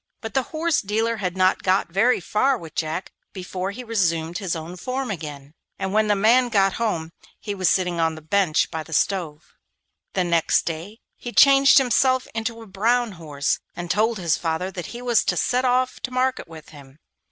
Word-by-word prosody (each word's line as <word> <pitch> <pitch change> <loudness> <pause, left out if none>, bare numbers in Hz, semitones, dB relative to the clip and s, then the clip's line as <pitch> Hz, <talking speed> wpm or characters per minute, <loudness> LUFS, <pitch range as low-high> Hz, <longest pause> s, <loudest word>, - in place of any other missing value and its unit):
But 225 - -7
the 265 - +2
horse 325 0 0
dealer 225 +3 -1
had 185 -3 -3
not 185 0 +3
got 185 -2 +1
very 230 +8 +3
far 255 +9 +1
with 165 -7 -11
Jack 160 +3 -3 0.2
before 185 0 -4
he 235 +5 -7
resumed 175 -7 -1
his 185 -4 -2
own 165 +2 -7
form 255 +6 -3
again, 150 -5 -7 0.2
and 190 0 -3
when 215 0 +3
the 205 - +3
man 240 +5 +4
got 195 -4 +3
home 165 -8 -1 0.3
he 205 - -4
was 185 -3 +1
sitting 180 -2 0
on 160 -1 +1
the 160 - -10
bench 180 -1 +1
by 160 -2 -3
the 160 +1 -10
stove. 165 -3 -1 0.6
The 185 - +1
next 170 -2 +2
day 170 +7 -6 0.2
he 240 - -7
changed 275 +1 +6
himself 260 0 +3
into 225 0 -4
a - - -12
brown 230 +4 +1
horse 150 -5 -2 0.2
and 175 -1 -4
told 220 +2 +1
his 170 -4 0
father 165 +3 -2
that 175 -3 -6
he 240 +1 -8
was 240 -3 +3
to - - 0
set 250 +1 +1
off 255 0 +1
to 255 - -4
market 255 -2 -1
with 160 -2 -12
him. 140 -2 -15
195 Hz, 200 wpm, -23 LUFS, 165-235 Hz, 0.6 s, changed